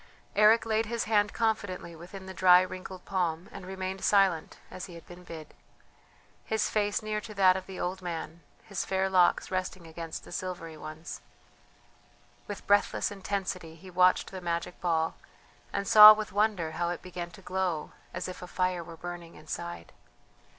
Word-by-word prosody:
Eric 215 +2 +6
laid 220 0 +1
his 235 0 -1
hand 210 -1 +2
confidently 205 -6 -2
within 185 +4 -10
the 190 - -7
dry 180 0 +7
wrinkled 185 0 -7
palm, 175 -3 -1
and 180 - -9
remained 190 0 -4
silent, 195 -5 +3
as 185 - -6
he 175 - -11
had 170 - -12
been 175 0 -12
bid, 160 -3 -10 0.9
his 215 -1 -1
face 205 0 0
near 215 0 -2
to 215 0 -10
that 190 -2 +5
of 190 0 -5
the 190 - -8
old 185 +1 -3
man, 170 -1 -5 0.2
his 205 -4 -3
fair 190 0 0
locks 180 0 +3
resting 185 -1 -3
against 165 0 -7
the - - -13
silvery 175 -4 -5
ones. 155 +1 -8 1.3
With 205 -1 -7
breathless 205 0 +2
intensity 190 -4 -4
he 185 +3 -13
watched 180 +1 +3
the 190 -1 -7
magic 170 0 -3
ball, 165 -2 0 0.5
and 200 - -2
saw 215 0 +12
with 215 0 -4
wonder 200 -5 +1
how 170 +2 -1
it 175 - -4
began 175 -1 -6
to 195 - -14
glow 180 -4 -2 0.2
as - - -4
if 185 - -8
a 180 - -7
fire 180 -1 -1
were 165 0 -11
burning 175 0 -8
inside. 155 - -7
185 Hz, 170 wpm, -29 LUFS, 170-200 Hz, 1.3 s, saw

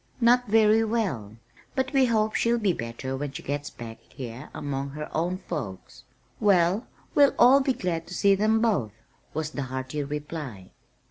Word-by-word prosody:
"Not 245 +1 +4
very 220 +1 +5
well, 185 - -2 0.4
but 265 +1 -1
we 265 -2 +5
hope 220 -2 +1
she'll 235 +1 +2
be 205 -5 +2
better 120 +1 -5
when 140 +1 -4
she - - -7
gets 145 +1 -3
back 115 -2 -9
here 125 +2 -8
among 140 -1 -4
her 150 +2 -7
own 175 +3 0
folks." 105 - -7 0.3
"Well, 190 +2 +3 0.3
we'll 285 -1 +5
all 260 +3 +7
be 265 -1 +1
glad 170 -6 -3
to 180 - -7
see 200 +2 +4
them 215 +3 +2
both," 190 - +1 0.4
was 155 0 -2
the 145 - -4
hearty 130 +3 -3
reply. 145 - -6
165 Hz, 170 wpm, -26 LUFS, 135-220 Hz, 0.4 s, all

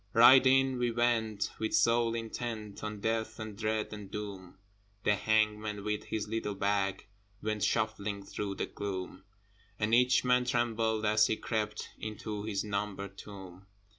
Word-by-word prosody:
Right 130 +3 +9
in 135 -1 +4
we 120 -1 +2
went, 115 -3 0
with 110 - 0
soul 115 0 +3
intent 115 -2 -5
On 105 -1 -4
Death 110 +1 -1
and 110 -2 -6
Dread 110 0 -1
and 105 -2 -8
Doom: 100 -3 -7 0.5
The 105 - +4
hangman, 105 0 +1
with 105 0 -2
his 110 -1 -3
little 105 -2 -2
bag, 100 -1 0 0.4
Went 105 -1 -1
shuffling 105 -3 0
through 100 -1 -4
the - - -2
gloom 95 -1 -5 0.5
And 110 +1 0
each 125 +2 +5
man 125 0 +3
trembled 115 -3 +1
as 105 0 +4
he 110 - 0
crept 105 -2 -3
Into 110 -1 -5
his 100 -3 -1
numbered 100 -2 -3
tomb. 95 -2 -11
110 Hz, 150 wpm, -31 LUFS, 100-115 Hz, 0.5 s, Right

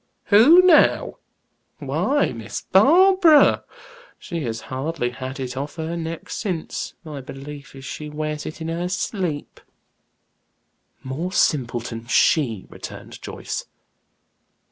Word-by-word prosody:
"'Who,' 280 - +8
now! 355 -4 +4 0.6
Why, 290 +1 0
Miss 115 -3 -6
Barbara. 330 - +5 0.5
She 170 -2 -5
has 115 -1 -4
hardly 130 -1 -3
had 130 +2 -7
it 125 -1 -4
off 140 +2 -5
her 160 0 -4
neck 165 -1 -5
since, 180 -7 -4
my 150 -4 -7
belief 140 +1 -10
is 135 0 -10
she 150 +1 -6
wears 150 0 -4
it 155 - -8
in 160 - -3
her 170 +2 -2
sleep." 180 -5 -3 1.4
"More 150 +8 -4
simpleton 120 -7 0
she," 120 - +2
returned - - -10
Joyce. - - -6
155 Hz, 115 wpm, -22 LUFS, 130-185 Hz, 1.4 s, Who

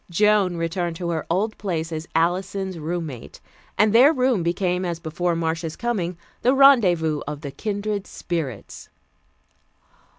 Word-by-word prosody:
Joan 200 -1 +3
returned 165 0 -2
to 170 0 -3
her 160 -2 -3
old 205 +6 -1
place 165 -5 -3
as 160 +1 -5
Alison's 185 +2 0
roommate, 160 -6 -5 0.4
and 210 0 +4
their 255 +6 +7
room 255 - +1
became 180 +2 0
as 170 -2 -3
before 170 +2 -2
Marcia's 165 -1 -2
coming, 190 -8 -2 0.2
the 255 +3 +3
rendezvous 180 - +5
of 150 0 -5
the 140 -3 -6
"Kindred 205 +4 -3
Spirits." 145 - -5
175 Hz, 135 wpm, -23 LUFS, 165-205 Hz, 0.4 s, their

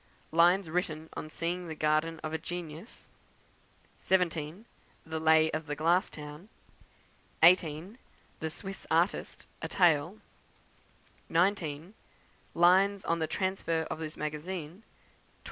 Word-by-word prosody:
Lines 175 +3 +4
written 160 -2 -2
on 155 - -6
seeing 175 +3 -3
the 160 - -5
Garden 155 +2 +1
of 155 - -4
a 160 - -1
Genius; 175 +3 -8 0.9
17. 175 +1 0 0.4
The 160 0 -4
Lay 160 0 +4
of 155 0 -4
the 145 - -2
Glass 170 +5 +2
Town; 150 +6 -10 0.9
18. 175 - +4 0.4
The 160 - -2
Swiss 195 +5 -8
Artist, 170 +4 0 0.2
a - - -3
Tale; 170 +1 +3 1.1
19. 170 -1 0 0.6
Lines 190 +3 +4
on 170 0 0
the 160 - 0
Transfer 185 -2 -1
of - - -4
this 155 -1 -6
Magazine; 150 +2 -4
20. 195 +6 -19
165 Hz, 120 wpm, -30 LUFS, 155-180 Hz, 1.1 s, Lines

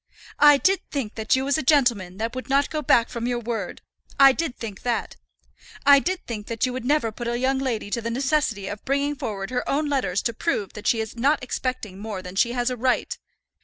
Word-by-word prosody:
I 295 -1 +8
did 380 +6 +2
think 260 -7 -3
that 220 +1 +1
you 260 +1 -1
was 285 +3 +1
a - - -1
gentleman 240 - +2
that 225 +2 -3
would 255 +1 -6
not 280 +1 +2
go 310 - -2
back 235 -5 +4
from 235 -1 -4
your 245 -1 0
word. 230 -5 -4 0.4
I 275 -1 +9
did 315 -1 -3
think 210 -4 -7
that. 240 -2 -2 0.7
I 280 0 +8
did 365 +5 -3
think 215 -3 -6
that 230 +1 -1
you 255 - -3
would 255 -1 -5
never 285 -4 +1
put 235 +2 -6
a 240 0 -1
young 265 +2 +1
lady 230 -6 -3
to 235 - -1
the 230 - -3
necessity 260 -5 0
of 205 +1 -6
bringing 280 +2 0
forward 200 -6 -5
her 250 - -2
own 295 +1 0
letters 255 -9 0
to 235 - -1
prove 215 - -2
that 210 - -6
she 225 - +3
is 220 +1 -6
not 275 +4 +1
expecting 250 -6 -4
more 205 -3 -5
than 180 0 -9
she 235 +4 +2
has 245 0 0
a - - -2
right! 255 +2 0
245 Hz, 235 wpm, -24 LUFS, 220-275 Hz, 0.7 s, I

